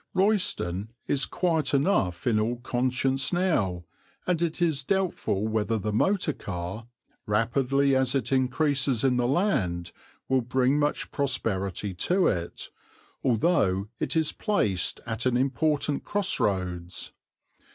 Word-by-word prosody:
Royston 185 Hz, -, +1 dB, 0.2 s
is 135 Hz, -2 st, +1 dB
quiet 160 Hz, -6 st, 0 dB
enough 115 Hz, -, +1 dB
in 115 Hz, -4 st, +3 dB
all 115 Hz, +3 st, 0 dB
conscience 130 Hz, +2 st, 0 dB
now, 105 Hz, -, 0 dB, 0.4 s
and 175 Hz, -2 st, 0 dB
it 170 Hz, -2 st, -1 dB
is 160 Hz, -5 st, +1 dB
doubtful 175 Hz, -, 0 dB
whether 110 Hz, +1 st, 0 dB
the 105 Hz, 0 st, -3 dB
motor 185 Hz, -, +2 dB
car, 95 Hz, +3 st, -6 dB, 0.4 s
rapidly 135 Hz, +6 st, +2 dB
as 130 Hz, 0 st, +1 dB
it 135 Hz, -3 st, -1 dB
increases 135 Hz, -1 st, +1 dB
in 130 Hz, -2 st, +3 dB
the 120 Hz, -1 st, +1 dB
land, 120 Hz, -, 0 dB, 0.4 s
will 130 Hz, -1 st, +2 dB
bring 130 Hz, +3 st, +1 dB
much 145 Hz, 0 st, -1 dB
prosperity 105 Hz, -, -1 dB
to 180 Hz, -, +1 dB
it, 85 Hz, -3 st, -2 dB, 0.5 s
although 110 Hz, -, +2 dB
it -, -, -2 dB
is 160 Hz, -1 st, +2 dB
placed 105 Hz, -, 0 dB
at 115 Hz, +2 st, -1 dB
important 140 Hz, +3 st, +1 dB
cross 205 Hz, -2 st, -1 dB
roads. 90 Hz, -3 st, -2 dB
130 Hz, 125 wpm, -27 LUFS, 105-150 Hz, 0.5 s, in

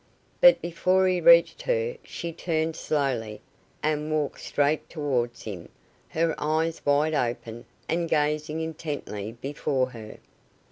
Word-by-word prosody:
But -, -, +7 dB
before 185 Hz, +2 st, +2 dB
he 180 Hz, -1 st, +1 dB
reached 170 Hz, 0 st, +6 dB
her 480 Hz, -1 st, 0 dB
she 170 Hz, -1 st, -6 dB
turned 160 Hz, -1 st, -1 dB
slowly, 125 Hz, -10 st, -1 dB, 0.4 s
and 155 Hz, 0 st, 0 dB
walked 150 Hz, -2 st, -1 dB
straight 145 Hz, +2 st, 0 dB
towards 130 Hz, -7 st, -2 dB
him, 95 Hz, -6 st, -7 dB, 0.4 s
her 165 Hz, 0 st, +1 dB
eyes 160 Hz, +2 st, -1 dB
wide 145 Hz, +2 st, +2 dB
open, 120 Hz, -3 st, -2 dB, 0.2 s
and 170 Hz, 0 st, -1 dB
gazing 150 Hz, +1 st, 0 dB
intently 145 Hz, -10 st, -5 dB
before 130 Hz, 0 st, -2 dB
her. 110 Hz, -3 st, -10 dB
150 Hz, 125 wpm, -26 LUFS, 130-165 Hz, 0.4 s, But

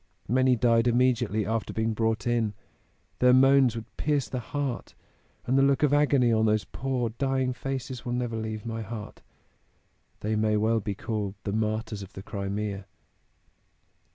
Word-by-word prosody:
Many 130 Hz, +2 st, +3 dB
died 115 Hz, 0 st, +3 dB
immediately 120 Hz, -3 st, +2 dB
after 110 Hz, +1 st, -2 dB
being 110 Hz, 0 st, 0 dB
brought 110 Hz, -1 st, 0 dB
in 115 Hz, -4 st, 0 dB, 0.6 s
their 125 Hz, 0 st, +6 dB
moans 135 Hz, -2 st, +5 dB
would 115 Hz, 0 st, -9 dB
pierce 145 Hz, -3 st, 0 dB
the 125 Hz, -, -3 dB
heart 135 Hz, +1 st, -4 dB, 0.5 s
and 130 Hz, +2 st, +2 dB
the -, -, +5 dB
look 140 Hz, +1 st, +3 dB
of 145 Hz, -1 st, +3 dB
agony 140 Hz, -5 st, +4 dB
on 110 Hz, 0 st, +3 dB
those 105 Hz, 0 st, +2 dB
poor 125 Hz, +3 st, -2 dB
dying 130 Hz, +1 st, 0 dB
faces 130 Hz, -1 st, -5 dB
will 120 Hz, -, -3 dB
never 120 Hz, -2 st, -2 dB
leave 110 Hz, 0 st, -4 dB
my 115 Hz, -1 st, -4 dB
heart. 110 Hz, 0 st, -7 dB, 1.0 s
They 110 Hz, +1 st, -1 dB
may 110 Hz, 0 st, +2 dB
well 110 Hz, +2 st, +2 dB
be 100 Hz, -1 st, -4 dB
called 105 Hz, -2 st, -3 dB
'the 100 Hz, -, -3 dB
martyrs 110 Hz, -1 st, -2 dB
of 95 Hz, 0 st, -10 dB
the 95 Hz, -, -8 dB
Crimea.'" 100 Hz, -1 st, -4 dB
115 Hz, 160 wpm, -27 LUFS, 110-130 Hz, 1.0 s, their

